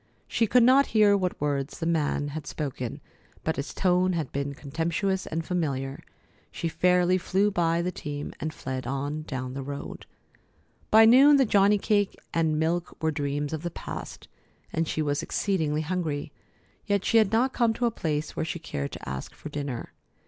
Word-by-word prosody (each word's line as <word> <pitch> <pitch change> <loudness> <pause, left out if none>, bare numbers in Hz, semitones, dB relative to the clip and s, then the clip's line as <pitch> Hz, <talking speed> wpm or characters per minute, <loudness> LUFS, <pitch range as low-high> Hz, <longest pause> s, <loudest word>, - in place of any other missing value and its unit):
She 225 - +1
could 245 +3 +5
not 265 +3 +6
hear 205 -1 +6
what 185 -2 -1
words 140 -1 -2
the 165 - -3
man 150 -3 0
had 150 0 -6
spoken, 130 -5 -4 0.4
but 160 - 0
his 140 - -3
tone 185 0 +2
had 160 -6 -2
been 140 0 -3
contemptuous 170 +7 -2
and 165 +1 -3
familiar. 140 -6 -2 0.5
She 165 - -3
fairly 180 +2 +3
flew 195 +3 +1
by 170 -2 +1
the 180 - -1
team, 145 -3 -6
and 155 +2 -3
fled 130 -4 -5
on 140 +3 -2
down 130 -4 -5
the 135 - -4
road. 140 +1 -7 0.8
By 220 +1 +8
noon 275 +5 +8
the 270 - +4
johnny 205 -1 +4
cake 205 -1 +1 0.2
and 160 -2 +1
milk 165 +3 -1
were 160 0 +1
dreams 145 0 -2
of 160 - -3
the 175 - -3
past, - - -8 0.5
and 165 0 0
she 155 - -1
was 145 -1 0
exceedingly 160 -7 0
hungry, 155 -3 -2 0.6
yet 200 -2 +1
she 230 - +5
had 210 -3 +3
not 245 +4 +2
come 235 -2 +3
to 245 - 0
a 235 - +2
place 155 -6 -3
where - - -2
she 165 - -3
cared 70 - -4
to - - -8
ask 65 0 -5
for 155 - -8
dinner. 140 -5 -5
160 Hz, 185 wpm, -27 LUFS, 145-190 Hz, 0.8 s, By